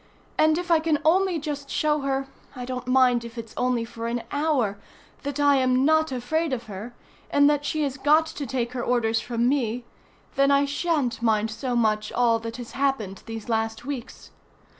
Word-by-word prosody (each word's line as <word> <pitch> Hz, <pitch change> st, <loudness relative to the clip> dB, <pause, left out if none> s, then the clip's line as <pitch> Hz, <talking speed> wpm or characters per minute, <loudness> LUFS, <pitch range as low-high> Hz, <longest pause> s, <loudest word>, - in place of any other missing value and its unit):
And 310 Hz, 0 st, +4 dB
if 350 Hz, 0 st, -3 dB
I 330 Hz, -, +6 dB
can 315 Hz, -1 st, +1 dB
only 365 Hz, +2 st, +3 dB
just 290 Hz, -2 st, -5 dB
show 300 Hz, 0 st, +1 dB
her 270 Hz, -1 st, -1 dB, 0.3 s
I 250 Hz, -1 st, -5 dB
don't 250 Hz, 0 st, -5 dB
mind 255 Hz, -2 st, +4 dB
if 235 Hz, +1 st, -10 dB
it's 230 Hz, -1 st, -7 dB
only 250 Hz, -2 st, 0 dB
for 230 Hz, 0 st, -6 dB
an 235 Hz, 0 st, -2 dB
hour 280 Hz, -9 st, 0 dB, 0.4 s
that 285 Hz, 0 st, -4 dB
I 285 Hz, -1 st, +5 dB
am 255 Hz, 0 st, +3 dB
not 315 Hz, -1 st, +3 dB
afraid 280 Hz, +5 st, -1 dB
of 245 Hz, -2 st, -3 dB
her, 220 Hz, +3 st, -8 dB, 0.3 s
and 285 Hz, 0 st, +5 dB
that 290 Hz, -1 st, +1 dB
she 310 Hz, +1 st, 0 dB
has 275 Hz, -1 st, -2 dB
got 305 Hz, +3 st, +4 dB
to 290 Hz, -3 st, -6 dB
take 240 Hz, -1 st, -2 dB
her 245 Hz, -2 st, -3 dB
orders 230 Hz, -2 st, +1 dB
from 235 Hz, 0 st, 0 dB
me, 245 Hz, -3 st, 0 dB, 0.5 s
then 275 Hz, 0 st, +3 dB
I 280 Hz, 0 st, +4 dB
shan't 285 Hz, -5 st, -1 dB
mind 220 Hz, -1 st, +1 dB
so 245 Hz, +3 st, -3 dB
much 215 Hz, -2 st, +1 dB
all 235 Hz, -2 st, +3 dB
that 230 Hz, +1 st, -6 dB
has 245 Hz, -2 st, -8 dB
happened 265 Hz, -9 st, -1 dB
these 225 Hz, -1 st, -6 dB
last 225 Hz, 0 st, -1 dB
weeks. 270 Hz, -4 st, -7 dB
255 Hz, 195 wpm, -25 LUFS, 230-290 Hz, 0.5 s, I